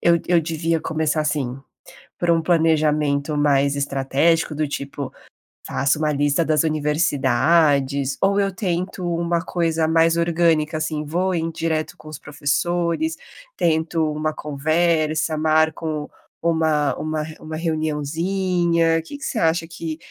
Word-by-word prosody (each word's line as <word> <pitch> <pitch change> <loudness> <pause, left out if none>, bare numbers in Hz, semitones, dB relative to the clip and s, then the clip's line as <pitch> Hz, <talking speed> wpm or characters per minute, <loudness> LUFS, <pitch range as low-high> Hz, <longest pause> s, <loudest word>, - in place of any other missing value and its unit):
eu 170 0 +4
eu 175 -1 +4
devia 165 0 -1
começar, 155 -1 -1
assim, 140 -4 -2 0.6
por 175 - -1
um 165 -1 +3
planejamento 155 -3 +1
mais 140 -1 +2
estratégico, 140 +3 +1
do 155 0 -1
tipo, 140 -1 -5 0.5
faço 140 +3 +1
uma 155 -1 0
lista 145 +3 +1
das 155 -1 +2
universidades? 145 -2 +2
Ou 200 +1 +3
eu 195 -1 0
tento 180 0 -3
uma 170 0 0
coisa 165 -3 0
mais 165 +1 +3
orgânica, 165 -2 +1
assim, 155 -1 -2
vou 180 +5 -1
em 165 -1 -1
direto 160 -1 -2
com 155 - -13
os 155 - -8
professores, 170 - -1 0.4
tento 160 -1 +1
uma 155 +1 -2
conversa, 155 +1 0
marco 155 -1 0 0.3
uma 160 -3 +1
uma 155 0 -2
re 155 0 -9
uma 155 0 -7
reuniãozinha. 165 +2 0
Que 285 - -9
que 285 - -12
você 230 - -2
acha 165 0 +1
que 165 -1 -6
160 Hz, 135 wpm, -21 LUFS, 150-170 Hz, 0.6 s, eu